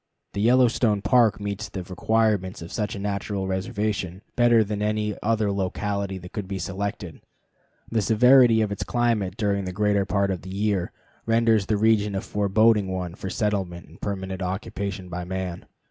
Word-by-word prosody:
The 100 - -2
Yellowstone 115 -3 +3
Park 115 -6 +4
meets 100 0 -4
the 95 - -5
requirements 95 0 0
of 85 - -10
such 105 -2 -2
a - - -6
natural 100 -1 -2
reservation 95 -1 -2
better 120 -2 +5
than 105 0 -4
any 105 0 0
other 110 -2 +1
locality 100 0 -2
that 90 0 -10
could 105 -3 -4
be 95 0 -4
selected. 100 -1 -5 0.7
The 115 -1 0
severity 120 +2 +5
of 105 - -2
its 100 -1 -3
climate 110 -3 0
during 100 -3 0
the 90 - -3
greater 100 +1 +1
part 100 0 +1
of 90 - -3
the 95 - -10
year 100 -2 -1 0.4
renders 115 -3 +3
the 105 - +1
region 105 -1 +2
a 95 - -1
forbidding 105 +1 +2
one 90 -2 -4
for 95 - -6
settlement 95 -5 -2
and 85 - -17
permanent 95 -1 -4
occupation 95 0 -4
by 90 0 -5
man. 90 -1 -5
100 Hz, 170 wpm, -25 LUFS, 95-110 Hz, 0.7 s, better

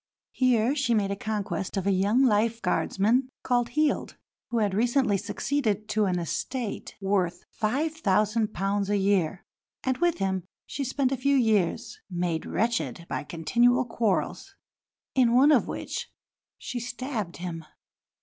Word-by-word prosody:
Here 250 -1 +2
she 270 -5 +1
made 200 -2 +1
a - - -1
conquest 205 -3 -3
of 190 - -1
a 200 - +3
young 200 +7 +3
Life 225 -1 +2
Guardsman, 225 +6 +1
called 245 -2 +1
Heald, 305 -1 +1 0.3
who 235 - -1
had 205 -3 +1
recently 240 +1 +2
succeeded 215 +1 -1
to 215 -1 +2
an 185 -2 0
estate 220 - -4
worth 185 -3 0 0.2
£5000 215 - 0
a 205 - +2
year; 195 -2 +1 0.4
and 260 -1 0
with 345 -1 +2
him 190 -2 -1 0.2
she 280 - -4
spent 265 0 0
a 270 - 0
few 280 +3 +2
years, 215 -9 +1
made 175 -3 -2
wretched 175 - -1
by - - -2
continual 240 +12 +2
quarrels, 230 - -1 0.6
in 245 -3 +4
one 275 +4 +6
of - - +4
which - - -5 0.5
she 245 - -5
stabbed 240 -5 -4
him. 170 -2 -5
215 Hz, 140 wpm, -27 LUFS, 195-250 Hz, 0.6 s, one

